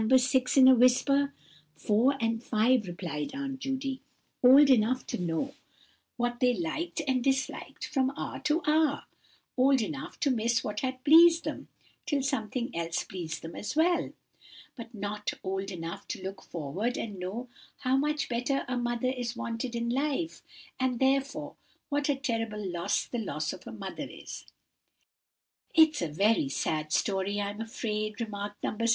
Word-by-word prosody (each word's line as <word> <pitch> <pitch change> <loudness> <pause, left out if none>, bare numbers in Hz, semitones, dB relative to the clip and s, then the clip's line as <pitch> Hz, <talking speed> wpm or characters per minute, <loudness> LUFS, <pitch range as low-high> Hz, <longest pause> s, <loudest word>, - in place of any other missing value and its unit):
6, 255 +1 +2
in 260 -1 +9
a 260 - +9
whisper. 260 +3 +4 0.4
"Four 240 +6 +2
and 225 0 -1
five," 225 -1 +2
replied 170 - -4
Aunt 275 -1 -4
Judy; 265 0 -3 0.4
"old 270 +4 +9
enough 255 +1 +3
to - - -4
know 175 +11 -2 0.6
what 240 0 -1
they 250 -1 +3
liked 310 - -3
and 255 -2 +1
disliked 265 0 -1
from 265 -3 +1
hour - - -4
to 305 +3 +1
hour. 305 -1 +2 0.5
Old 270 +1 +4
enough 265 +5 -5
to 285 - +3
miss 235 -1 +1
what 210 0 -3
had 255 -1 -3
pleased 330 +3 +7
them, - - -5 0.4
till 290 -3 +1
something 250 -2 -2
else 165 0 -1
pleased 165 -4 -6
them 165 +1 -7
as 210 - -5
well. 340 +3 +2 0.6
But 235 -3 -9
not 205 0 -3
old 195 +1 -2
enough 170 -3 -6
to - - -5
look 190 0 -6
forward 175 - -3
and 205 -4 -5
know 215 +8 -5 0.3
how 255 0 +2
much 300 +2 0
a 255 +2 -1
mother 240 +1 0
is 245 -1 -3
wanted 235 +1 -4
in 235 0 -1
life; 295 +5 -1 0.4
and, 260 -1 +1
therefore, 270 +1 0 0.3
what 290 0 0
a 285 - +3
terrible 225 -6 -2
loss 170 -1 0
the 240 - -4
loss 155 -8 -2
of 185 - -11
a - - -6
mother 200 -4 -6
is." - - -9 1.3
"It's 315 -2 +6
a 170 - 0
very 195 0 +2
sad 155 +2 -2
story 195 +3 0
I'm 205 +1 -3
afraid," 215 -2 -3
remarked 205 -2 -5
No. - - -1
6. 230 0 +2
240 Hz, 160 wpm, -29 LUFS, 205-270 Hz, 1.3 s, in